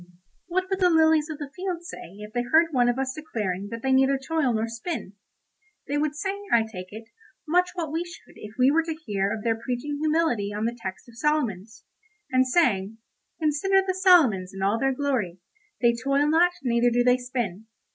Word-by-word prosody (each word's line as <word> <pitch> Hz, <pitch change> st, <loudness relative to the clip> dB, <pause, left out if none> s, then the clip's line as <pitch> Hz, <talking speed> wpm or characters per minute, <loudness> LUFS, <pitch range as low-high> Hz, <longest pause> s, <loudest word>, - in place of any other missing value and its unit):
What 370 Hz, +1 st, -1 dB
would 385 Hz, -, 0 dB
the 365 Hz, -2 st, +4 dB
lilies 320 Hz, -1 st, +4 dB
of 310 Hz, -, -5 dB
the 290 Hz, -2 st, -7 dB
field 365 Hz, -2 st, -4 dB
say 180 Hz, -, -9 dB
if 210 Hz, +1 st, -10 dB
they 245 Hz, -, 0 dB
heard 320 Hz, +7 st, +3 dB
one 245 Hz, -3 st, +3 dB
of 245 Hz, -, 0 dB
us 265 Hz, -1 st, -1 dB
declaring 205 Hz, -11 st, -4 dB
that 230 Hz, 0 st, -7 dB
they 265 Hz, -, +1 dB
neither 265 Hz, +1 st, +4 dB
toil 280 Hz, -1 st, 0 dB
nor 225 Hz, 0 st, 0 dB
spin? 230 Hz, -, -5 dB, 0.7 s
They 290 Hz, +1 st, 0 dB
would 300 Hz, 0 st, -1 dB
say, 390 Hz, +6 st, -3 dB
I 230 Hz, -1 st, +5 dB
take 185 Hz, -5 st, -8 dB
it, 225 Hz, +2 st, -10 dB, 0.4 s
much 360 Hz, +3 st, +3 dB
what 330 Hz, -4 st, -3 dB
we 325 Hz, +2 st, -1 dB
should 345 Hz, -1 st, -13 dB
if 210 Hz, 0 st, -11 dB
we 260 Hz, +2 st, +5 dB
were 325 Hz, +2 st, +3 dB
to 325 Hz, -1 st, -4 dB
hear 205 Hz, -10 st, -2 dB
of 220 Hz, -1 st, -4 dB
their 230 Hz, -1 st, +1 dB
preaching 250 Hz, +5 st, -4 dB
humility 305 Hz, -10 st, +1 dB
on 210 Hz, +2 st, -2 dB
the 235 Hz, +1 st, -1 dB
text 190 Hz, -3 st, -7 dB
of 235 Hz, -1 st, -14 dB
Solomons, 230 Hz, -9 st, -1 dB, 0.5 s
and 255 Hz, 0 st, +3 dB
saying, 225 Hz, -, +1 dB, 0.4 s
"Consider 340 Hz, +5 st, +2 dB
the 375 Hz, -, 0 dB
Solomons 285 Hz, -, +4 dB
in 195 Hz, -, -4 dB
all 205 Hz, +4 st, +1 dB
their 270 Hz, 0 st, +2 dB
glory, 255 Hz, -10 st, -1 dB, 0.4 s
they 235 Hz, -1 st, +4 dB
toil 275 Hz, +5 st, +1 dB
not 340 Hz, +3 st, +4 dB
neither 240 Hz, -1 st, +3 dB
do 245 Hz, +1 st, +2 dB
they 250 Hz, 0 st, +4 dB
spin." 240 Hz, -5 st, -4 dB
260 Hz, 205 wpm, -25 LUFS, 225-315 Hz, 0.7 s, I